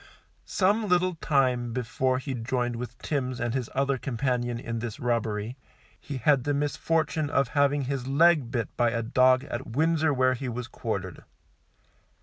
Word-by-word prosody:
Some 205 +3 +2
little 180 0 +2
time 130 -7 +1
before 130 +1 0
he 135 +1 -4
joined 120 0 -1
with 120 +1 -6
Timms 130 -4 -2
and 120 -2 -1
his 130 -3 -2
other 135 -1 +1
companion 120 -2 -1
in 115 -1 -4
this 115 -2 -5
robbery, 115 -1 -1 0.4
he 140 - -6
had 135 +1 +3
the 145 +1 0
misfortune 155 +2 0
of 140 -4 +1
having 145 0 +2
his 130 -1 -3
leg 150 -2 +4
bit 120 -4 -3
by 120 -1 +3
a 115 0 -2
dog 130 +3 +4
at 130 -2 -5
Windsor, 160 0 +2
where 130 -1 +3
he 130 0 -4
was 120 0 -5
quartered. - - -5
130 Hz, 160 wpm, -27 LUFS, 120-145 Hz, 0.4 s, leg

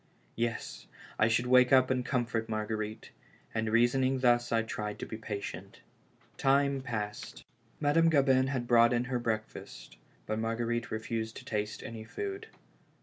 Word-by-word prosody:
Yes, 115 0 -3 0.3
I 110 - +5
should 115 +2 +1
wake 125 0 +5
up 130 -1 +5
and 130 -1 +1
comfort 120 -3 -1
Marguerite; 110 0 -4 0.4
and 110 -1 -1
reason 120 +4 +3
ing 130 0 +1
thus 120 -1 +3
I 115 -1 +2
tried 105 -2 -4
to - - -5
be - - -7
patient. 105 -2 -7 0.6
Time 140 0 +2
passed. 105 -4 -5 0.3
Madame 165 +3 +4
Gabin 135 -4 +4
had 130 -3 -2
brought 120 0 +5
in 120 0 +1
her 125 -1 -2
breakfast, 110 - -5 0.3
but 110 +1 -2
Marguerite 115 +1 -1
refused 110 0 -3
to 130 - -11
taste 105 -3 -3
any 115 -1 -7
food. 400 - -5
120 Hz, 150 wpm, -31 LUFS, 110-130 Hz, 0.6 s, I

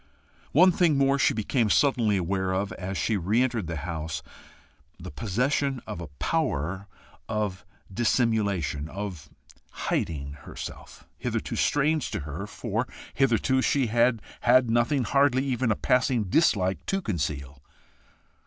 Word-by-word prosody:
One 180 +6 +6
thing 170 -4 +3
more 140 0 +3
she - - +3
became 110 +1 +1
suddenly 115 -4 +3
aware 95 +1 -1
of 100 +2 -1
as 95 +1 -5
she 110 +3 +1
re 105 +7 +2
entered 115 -8 -1
the 85 - -3
house 80 0 -4 0.8
the 90 +2 -8
possession 130 +5 0
of 105 -5 -6
a 85 - -6
power 95 - -1 0.4
of 105 -3 -2 0.3
dissimulation, 100 - 0
of 95 -5 -6 0.4
hiding 70 -3 -3
herself, 70 - -9 0.2
hitherto - - -2
strange 150 +1 +1
to - - -3
her, 80 +7 -6
for - - -3 0.3
hitherto 130 0 +2
she 135 0 +2
had 120 -2 +3 0.2
had 125 -1 +4
nothing, 120 +4 +2
hardly 140 +1 +3
even 130 -2 0
a - - +2
passing 125 -1 +2
dislike 95 - +2
to 195 - +1
conceal. 70 - -3
110 Hz, 135 wpm, -27 LUFS, 90-130 Hz, 0.8 s, One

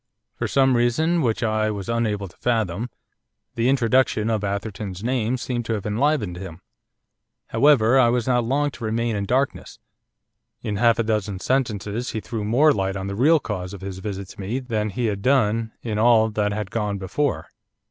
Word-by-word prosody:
For - - -3
some 135 -2 +3
reason, 160 +9 +2
which 120 -3 0
I 110 -1 +1
was 100 -2 -5
unable 110 -4 -1
to 85 - -18
fathom, 115 -2 -1 0.6
the 115 +2 +1
introduction 125 -3 +2
of 110 -2 -1
Atherton's 100 -1 -4
name 125 0 0
seemed 120 -1 -3
to 115 - -1
have 105 -3 -4
enlivened 105 - 0
him. 90 -2 -8 0.9
However, 135 -3 +4
I 120 -2 +5
was 120 -1 0
not 125 -2 +2
long 145 +5 0
to 125 - -11
remain 115 +1 -1
in 100 -1 -2
darkness. 130 +4 -1 0.9
In 105 -2 -2
half 115 +1 +4
a 115 - +1
dozen 105 -3 -1
sentences 115 -1 -1
he 110 - -2
threw 110 +2 -5
more 135 +9 +4
light 95 -3 -1
on 95 -1 -4
the 100 0 -4
real 150 +8 +4
cause 100 -6 -5
of 95 - -11
his 95 -1 -6
visit 100 -1 -5
to - - -10
me 105 +6 -2
than 110 -5 -2
he 120 +5 -2
had 100 -3 -1
done 115 -3 +2
in 110 -3 -2
all 110 -1 +4
that 105 -1 0
had 105 -2 -4
gone 105 -3 -1
before. 100 +10 -2
110 Hz, 190 wpm, -23 LUFS, 100-125 Hz, 0.9 s, I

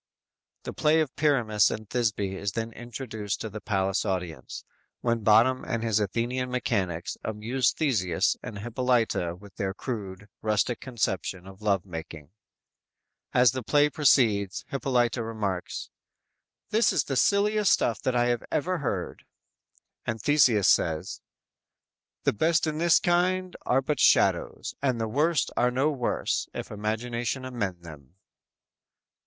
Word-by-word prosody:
"_ - - -46
The - - -6
play 155 +1 +3
of 155 -4 -1
Pyramus 115 -9 +3
and 110 0 -5
Thisby 105 -5 -1
is 100 +1 -3
then 115 0 -3
introduced 110 -3 -5
to 110 - -5
the 110 - -7
palace 95 -1 0
audience, 90 -8 -4 0.4
when 115 -1 +1
Bottom 115 +5 +4
and 115 -1 -3
his 110 -2 +2
Athenian 120 +5 -1
mechanics 95 -9 -2
amuse 110 +3 0
Theseus 100 - +1
and 105 - -7
Hippolyta 115 -5 0
with 100 +2 -16
their 95 -2 -2
crude, 100 -6 -6
rustic 110 +2 0
conception 95 -7 -3
of 95 +1 -13
love 100 -3 +1
making. 80 -3 -8 1.0
As 125 -1 +5
the 130 - -4
play 145 +4 +3
proceeds 110 - +2
Hippolyta 125 -3 0
remarks: 105 -5 -4 0.8
"This 220 +2 +4
is - - +1
the 135 - -3
silliest 205 +6 +3
stuff 115 -4 +1
that 130 - 0
I 120 0 +3 0.2
ever 180 +4 0
heard." 100 -10 -3 0.8
And 110 - -2
Theseus 120 -5 +4
says: 80 -1 +1 1.0
_"The - - +1
best 160 +9 +2
in 155 -1 -2
this 170 0 +5
kind 180 +1 +1
are 135 +2 +3
but 150 +3 -1
shadows; - - +2
And 130 -4 0
the 115 - -1
worst 150 +5 +1
are 125 - +3
no 135 +5 +1
worse, 130 -5 -1
if - - -6
imagination 120 +4 -3
amend 100 -9 -4
them!" 75 -2 -13
115 Hz, 140 wpm, -27 LUFS, 100-130 Hz, 1.0 s, As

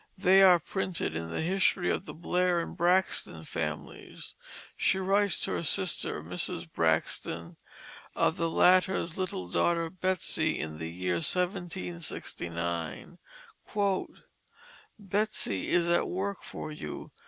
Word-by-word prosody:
They 190 +1 +6
are 185 -2 +8
printed 175 - -3
in 80 0 -4
the 80 - -2
History 180 +1 +2
of - - -2
the - - -6
Blair 180 +1 +1
and 170 - -4
Braxton 180 +2 +1
Families. - - -5 0.4
She 190 - +2
writes 195 0 +2
to - - -1
her - - -1
sister, 180 +2 -1
Mrs. 85 - -3
Braxton, 80 +1 0 0.6
of - - +2
the 165 -3 0
latter's 180 0 +3
little 175 - -2
daughter, 165 - +1
Betsey, 185 -3 0
in 80 -1 -5
the 80 0 -4
year 90 +1 -1
1769: 170 - -3 1.8
"Betsey 205 - -1
is 170 -1 +3
at 170 0 +2
work 195 +2 -2
for 155 - -7
you. 115 - -7
175 Hz, 120 wpm, -30 LUFS, -, 1.8 s, are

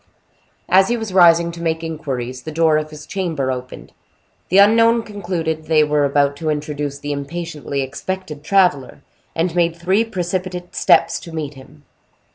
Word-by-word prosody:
As 190 +1 +5
he 240 - 0
was 220 -4 -5
rising 170 -2 +5
to 170 0 -9
make 160 -1 -1
inquiries, 130 -6 -5
the 155 - -7
door 160 -1 +3
of 155 0 -3
his 150 -1 -11
chamber 165 -9 -2
opened. 125 0 -7 0.6
The 185 - +3
unknown 230 +3 +5
concluded 175 -7 -4
they 155 -1 +4
were 150 -1 +1
about 140 0 +2
to 155 +1 -3
introduce 150 -1 -3
the 145 +1 -5
impatiently 145 -1 -4
expected 150 +2 -6
traveler, 170 -5 +1 0.3
and 165 +1 0
made 170 -1 +1
three 185 +6 +1
precipitate 180 -3 -4
steps 165 0 +3
to 170 - -11
meet 155 -3 -4
him. 140 +2 -16
165 Hz, 160 wpm, -19 LUFS, 145-180 Hz, 0.6 s, As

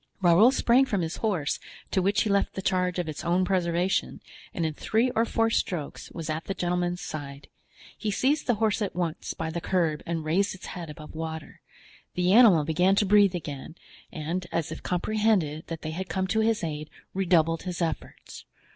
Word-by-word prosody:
Raoul 185 +5 +6
sprang 260 0 +4
from 200 -6 0
his 165 0 -3
horse, 185 -10 -1 0.3
to 190 - +2
which 200 +3 +2
he 215 - -2
left 200 0 +1
the 190 - -3
charge 180 -1 +1
of 175 -2 -2
its 155 - -5
own 175 +2 +2
preservation, 180 0 0 0.3
and 170 - -2
in 160 - -1
three 225 +10 +1
or 225 0 +2
four 225 0 +1
strokes 165 -9 -2
was 165 -2 -6
at 155 +1 -3
the 195 - -3
gentleman's 175 0 -1
side; 140 -2 -7 0.5
he 215 - -3
seized 270 +8 +1
the 245 - +3
horse 220 +1 +1
at 200 -5 -2
once 170 -3 -3
by 160 0 -3
the 170 +1 -4
curb 165 -5 0
and 165 -2 -2
raised 190 +6 +1
its 190 - -11
head 175 -3 -7
above 150 0 -10
water; 160 -1 -6 0.5
the 180 +1 +2
animal 210 -9 +7
began 180 +5 +2
to 205 - +3
breathe 200 -2 +5
again 155 -2 -6 0.4
and, 170 +3 -3
as 165 -2 -2
if - - -5
he - - -17
comprehended 180 -5 0
that 165 -1 -6
they 155 - -3
had 185 +3 -5
come 190 -1 -1
to 220 +4 0
his 220 -2 +1
aid, 155 -2 -4 0.2
redoubled 170 -4 +2
his 180 -2 -5
efforts. 170 -2 -5
180 Hz, 200 wpm, -27 LUFS, 160-200 Hz, 0.5 s, animal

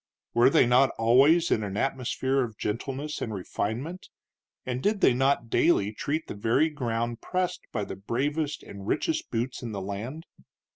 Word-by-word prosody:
Were 120 +2 +6
they 135 - +5
not 125 +3 +5
always 135 +9 +5
in 110 - +3
an 100 -1 -4
atmosphere 135 +2 0
of 110 -4 -6
gentleness 135 +7 -3
and 110 - -3
refinement, 120 - -4 0.6
and 125 0 -3
did 205 +4 +1
they - - +6
not 135 -2 +1
daily 105 -11 +3
tread 150 +8 -2
the - - -5
very 115 +10 +2
ground 120 -5 -2
pressed 185 -1 -2
by - - -2
the - - -7
bravest 145 +9 -2
and 100 0 -10
richest 325 - -1
boots 120 +2 -2
in 115 -3 -5
the 100 - -3
land? 110 - -5
125 Hz, 165 wpm, -27 LUFS, 115-150 Hz, 0.6 s, Were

